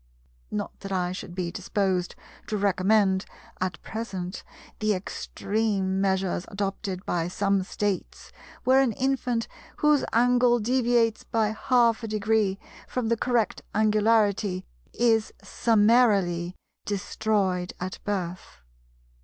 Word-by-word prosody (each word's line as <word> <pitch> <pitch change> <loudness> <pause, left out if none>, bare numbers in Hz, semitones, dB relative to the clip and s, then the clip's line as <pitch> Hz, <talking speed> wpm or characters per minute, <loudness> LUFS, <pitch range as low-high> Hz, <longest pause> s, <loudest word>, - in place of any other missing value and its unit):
Not 105 - -4
that 195 - -7
I 180 -2 0
should 180 -1 -7
be 180 -2 -2
disposed 190 -1 -1 0.3
to 215 - -1
recommend 195 0 +2 0.4
(at 185 -2 -2
present) 190 -5 -5 0.4
the 215 -1 +2
extreme 195 0 -1
measures 190 -2 0
adopted 195 -1 -4
by 170 -1 0
some 195 +1 +1
States, 195 0 -3 0.3
where 260 +1 +5
an 255 -4 +1
infant 250 -2 0 0.3
whose 300 -1 +3
angle 245 +1 +4
deviates 235 -1 +2
by 220 -2 0
half 235 +1 +2
a 225 - -4
degree 215 -2 +1 0.3
from 245 -3 -2
the 230 - +3
correct 235 -1 0
angularity 210 -3 +2 0.3
is 225 -2 +2
summarily 205 -6 +3 0.3
destroyed 195 -2 -1
at 185 +1 -5
birth. 180 - -4
205 Hz, 110 wpm, -26 LUFS, 190-230 Hz, 0.4 s, where